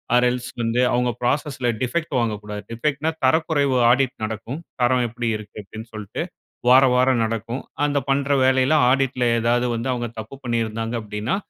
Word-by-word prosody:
Or 125 - +5
else 125 0 -3
வந்து 115 +1 0
அவங்க 125 0 +2
ப்ராசஸ்ல 135 -1 -1 0.2
டிஃபெக்ட் 155 +2 -2
வாங்கக்கூடாது. 105 -2 -3
டிஃபெக்ட்னா, 150 +6 -1
தரக்குறைவு 145 -1 +2 0.2
ஆடிட் 130 0 +2
நடக்கும். 110 +7 -4 0.2
தரம் 125 0 +3
எப்படி 120 +1 -4
இருக்கு 105 0 -11
அப்டீன்னு 110 +3 -10
சொல்ட்டு, 105 -2 -5 0.5
வாராவாரம் 130 -1 +5
நடக்கும். 115 +3 -3 0.2
அந்த 145 -1 0
பண்ற 140 +1 +1 0.2
வேலயில 130 +3 +3 0.2
ஆடிட்ல 130 -1 +1 0.2
ஏதாவது 120 +2 +2
வந்து 115 +3 -3
அவுங்க 120 -2 -3
தப்பு 110 +5 -8
பண்ணிருந்தாங்க 115 -1 -2
அப்டீன்னா, 105 - -2
125 Hz, 145 wpm, -22 LUFS, 115-135 Hz, 0.5 s, Or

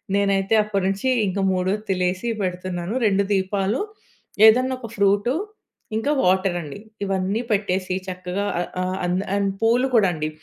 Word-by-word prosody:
నేనైతే 195 0 +1
అప్పటినుంచి 195 +2 -1 0.2
ఇంకా 195 +1 -1
మూడొత్తిలేసి 185 +1 -1 0.2
పెడుతున్నాను. 180 +1 -3
2 200 0 +2
దీపాలు, 195 +3 0 0.7
ఏదన్నా 255 +4 +4
ఒక 230 -3 -8
ఫ్రూటు, 200 +4 +2 0.6
ఇంకా 275 +7 0
వాటర్ 185 0 +2
అండి. 150 +2 -8 0.3
ఇవన్నీ 195 +3 -1
పెట్టేసి 190 -3 0
చక్కగా 185 +2 -3
ఆహ్, 175 - -3
ఆహ్, 185 0 -1
అన్ 175 +1 0 0.2
అండ్, 200 -1 +1
పూలు 240 +3 +3
కూడా 205 -5 +5
అండి. 155 -1 -3
195 Hz, 130 wpm, -22 LUFS, 185-205 Hz, 0.7 s, కూడా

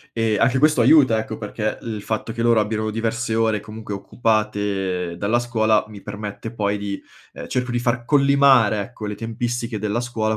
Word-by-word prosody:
e 115 -2 +1
anche 125 +4 +3
questo 150 -3 +4
aiuta, 130 -3 +5
ecco, 110 0 -4
perché 110 0 -3
il 110 -2 -5
fatto 110 +1 -3
che 115 - -2
loro 115 -1 +4
abbiano 110 0 -1
diverse 115 +1 -2
ore, 110 -2 +1
comunque, 105 0 -7
occupate 100 -5 -1
dalla 100 +6 +1
scuola 110 -3 +1
mi 105 -2 -11
permette 105 +1 -6
poi 105 -2 -1
di 100 -1 -5 0.3
uhm, - - -8
cerco 125 0 -1
di 120 - 0
far 120 0 -1
collimare, 135 -6 +4
ecco, 110 -1 -8
le 105 - -3
tempistiche 115 +1 -3
della 105 +3 -1
scuola 110 -3 -1
110 Hz, 180 wpm, -22 LUFS, 105-120 Hz, 0.3 s, aiuta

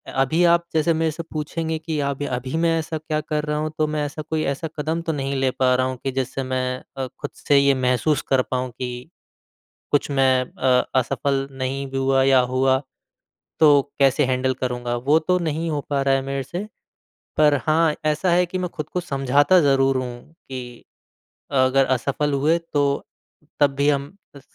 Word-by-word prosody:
अभी 135 +6 +2
आप 170 0 +4
जैसे 160 +1 +2
मेरे 160 0 0
से 165 +2 -6
पूछेंगे 160 +1 -3
कि 160 -1 -3
आप 140 0 -2
अभी 130 -2 -4
मैं 165 0 +2
ऐसा 160 0 -4
क्या 155 0 -2
कर 150 0 -2
रहा 150 0 -1
हूँ 155 +1 -2
तो 155 - +2
मैं 150 -1 -2
ऐसा 145 +2 -6
कोई 155 +1 -2
ऐसा 140 +4 -4
कदम 160 +3 -1
तो 160 - +2
नहीं 140 -1 -2
ले 135 -1 +1
पा 130 0 +2
रहा 130 0 +1
हूँ 130 - -4
कि 135 - -1
जिससे 135 +1 -3
मैं 130 0 -2
अ, 135 -1 -2
खुद 145 - -4
से 145 - +2
ये 140 0 +5
महसूस 130 +4 +1
कर 135 -1 +4
पाऊँ 130 0 -1
कि 125 +2 -6 0.8
कुछ 145 0 +1
मैं 135 -2 +3
अ, 125 0 +1
असफ़ल 135 +2 0
नहीं 135 +1 -3
भी 135 - -5
हुआ 135 0 +2
या 135 0 +5
हुआ, 130 +1 +2 0.8
तो 145 -3 +6 0.2
कैसे 135 +1 +4
हैंडल 130 0 0
करूँगा 125 -1 -3
वो 150 +3 +5
तो 180 +3 +1
नहीं 165 0 -2
हो 150 -2 -1
पा 140 -1 +1
रहा 135 0 +2
है 135 - 0
मेरे 135 0 -3
से, 175 +9 -5 0.7
पर 150 -1 +5
हाँ, 155 0 +3
ऐसा 155 +4 +1
है 180 +1 +4
कि 180 +1 -5
मैं 180 -1 -2
खुद 155 -2 -7
को 180 - -2
समझाता 145 +2 +3
ज़रूर 135 -2 +3
हूँ 125 +3 -6
कि 125 -7 -9 0.7
अगर 135 0 +3
असफ़ल 140 +3 0
हुए 150 +4 +2 0.2
तो 145 -1 +3 0.8
तब 140 -2 +3
भी 140 +1 +2
हम 140 +4 -1 0.2
स - - -14
140 Hz, 195 wpm, -22 LUFS, 130-155 Hz, 0.8 s, तो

